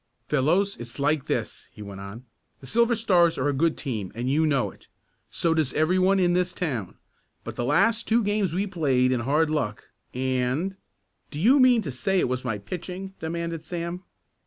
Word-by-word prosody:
"Fellows, 170 +8 +2
it's 120 0 -8
like 145 0 +1
this," - - -3
he 105 - -10
went 100 -1 -8
on. 100 +6 -9 0.3
"The - - -13
Silver 235 - +2
Stars 180 -7 +3
are 130 - 0
a - - 0
good 160 +4 +1
team 110 - -4
and 125 +3 -2
you 155 +3 +3
know 140 -4 +1
it. - - -21 0.4
So 165 -1 +1
does 155 -5 0
every 165 +4 +2
one 190 +1 +3
in 175 -1 +3
this 180 0 0
town, 125 - -3 0.5
but - - -7
the - - -2
last 220 - +2
two 230 +1 +3
games 205 -3 0
we've 190 +3 -2
played 130 -8 +2
in 125 - +1
hard 150 +6 +1
luck, 145 -9 -2 0.2
and 130 +8 -1 0.3
" - - -48
"Do 145 - -6
you 250 - +5
mean 250 -3 +5
to 145 - -4
say 190 +10 -1
it - - +2
was 125 0 -2
my 115 -5 -2
pitching?" 180 - -7
demanded 165 0 -4
Sam. 170 +2 -5
160 Hz, 200 wpm, -25 LUFS, 130-185 Hz, 0.5 s, you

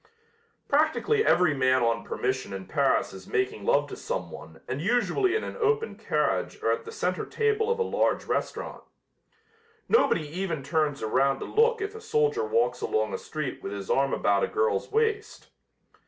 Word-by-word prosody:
Practically 315 +9 +2
every 180 - +4
man 130 -2 +2
on 115 0 +1
permission 130 -4 -3
in 95 -1 -6
Paris 95 - +1
is 95 -1 -11
making 125 -5 -1
love 145 +1 +3
to - - -7
someone 80 +1 -6
and 130 - -3
usually 245 - +1
in 440 - 0
an - - -6
open 440 0 0
carriage - - -1
or - - +3
at 465 - -2
the 450 - -7
center 450 - -2
table 440 0 0
of 470 - +1
a 470 - +1
large - - 0
restaurant. - - -3 1.0
Nobody 170 - +3
even 165 -2 -3
turns 145 -1 0
around 135 +5 +2
to - - -6
look 460 0 +2
if 405 +1 -3
a 445 - -9
soldier 450 0 +1
walks 465 0 +1
along 440 +1 0
a - - -1
street 455 -1 -5
with 395 0 -5
his - - -5
arm 480 - +2
about - - +2
a - - +2
girl's 450 +1 0
waist. 440 -1 -1
395 Hz, 175 wpm, -27 LUFS, -, 1.0 s, every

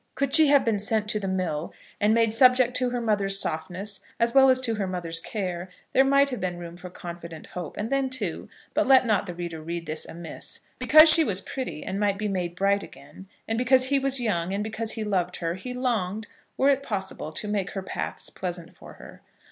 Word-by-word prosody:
Could 275 0 -1
she 315 -2 +7
have 285 -1 +4
been 220 -3 +1
sent 215 +1 0
to 210 - 0
the 195 - -4
mill, 175 -5 -2 0.3
and 210 +1 +3
made 225 -1 +3
subject 250 +1 +5
to 250 -1 +1
her 245 0 -2
mother's 200 -4 +1
softness 190 +5 -3 0.2
as 235 0 +2
well 270 -1 +7
as 255 0 +5
to 235 -3 0
her 205 -3 -2
mother's 170 -3 -2
care, 185 -2 -4 0.2
there 265 - +6
might 275 +1 +4
have 250 - -4
been 180 -1 -3
room 170 -1 -8
for 180 +1 -9
confident 170 -2 -9
hope. 180 -3 -7
And 215 +4 -3
then, 275 -1 +1
too, 215 -10 -3 0.2
but - - +1
let 265 -1 +6
not 210 -3 +1
the 175 - -6
reader 170 -2 -5
read 170 +1 -5
this 155 0 -4
amiss, 170 0 -8 0.2
because 310 +1 +8
she 320 +1 +6
was 200 -10 0
pretty 195 - -5
and 195 - -4
might 205 -1 +1
be 210 +1 -2
made 180 -3 -2
bright 200 +2 +2
again, 190 - -13 0.2
and 225 +1 -1
because 255 +1 +3
he 280 -1 +3
was 270 0 0
young, 190 -5 -1
and 205 - -1
because 220 +1 -3
he 225 - -4
loved 180 -4 -1
her, 165 -1 -2
he 190 +8 -7
longed, 220 -5 -1 0.3
were 270 - +4
it 275 -1 +3
possible, 190 - -4
to 210 - -4
make 205 -2 -1
her 195 - -4
paths - - -5
pleasant 175 -2 -6
for - - -13
her. - - -14
205 Hz, 225 wpm, -26 LUFS, 180-250 Hz, 0.3 s, because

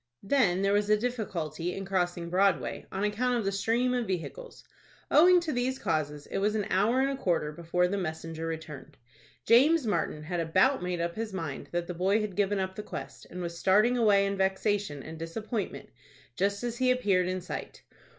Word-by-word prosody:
Then 195 -5 +2
there 200 0 +2
was 205 0 +1
a 210 - +5
difficulty 180 - -3
in 195 - -5
crossing 175 -3 -1
Broadway, 180 -10 +1
on 195 - -3
account 240 +4 +1
of 225 - -2
the 195 - +1
stream 230 +5 +1
of 245 -3 -1
vehicles. 195 - -5 0.5
Owing 355 +4 +7
to 325 -3 -3
these 255 +1 -1
causes, 150 - -2
it - - -1
was 210 +2 +1
an 210 -2 0
hour 220 +7 +3
and 275 +1 +1
a - - -2
quarter 165 -4 0
before 170 +3 0
the 200 +2 -2
messenger 165 -1 -4
returned. 155 -3 -7 0.5
James 275 +6 +5
Martin 165 -6 -1
had 175 +3 -3
about 250 +12 +3
made 180 -1 -2
up 170 0 -1
his 220 0 -5
mind 165 -7 -5
that 175 0 -1
the 180 - -5
boy 190 +5 +2
had 210 -4 -3
given 205 0 +1
up 190 -1 -2
the 210 - -6
quest, 140 -8 -8
and 180 0 -6
was 170 0 -5
starting 210 +6 +4
away 205 -4 +4
in 200 0 -2
vexation 190 -5 0
and 160 0 -9
disappointment, 210 +5 -4 0.5
just 200 - 0
as 240 0 -3
he 255 0 +3
appeared 200 -8 +2
in 185 0 -1
sight. 180 - -7
195 Hz, 200 wpm, -29 LUFS, 170-225 Hz, 0.5 s, Owing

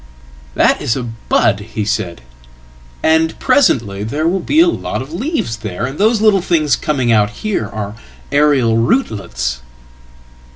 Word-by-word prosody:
"That - - +3
is 115 - 0
a 130 - -3
bud," 115 -2 0
he 105 0 -5
said, 85 - -2 0.8
"and 160 0 +2
presently 120 - +2
there 145 +9 -1
will 190 +3 +1
be 295 - +1
a 340 - +6
lot 335 - -2
of 135 +6 -8
leavesthere, 115 - -3
and 135 +3 -6
those 220 +1 +3
little 210 -3 +4
things 155 -7 +2
coming 130 -6 0
out 105 -2 +3
here 155 - -3
are 105 0 -5 0.4
aerial 140 -6 +3
rootlets."" 100 - -1
130 Hz, 140 wpm, -16 LUFS, 105-175 Hz, 0.8 s, a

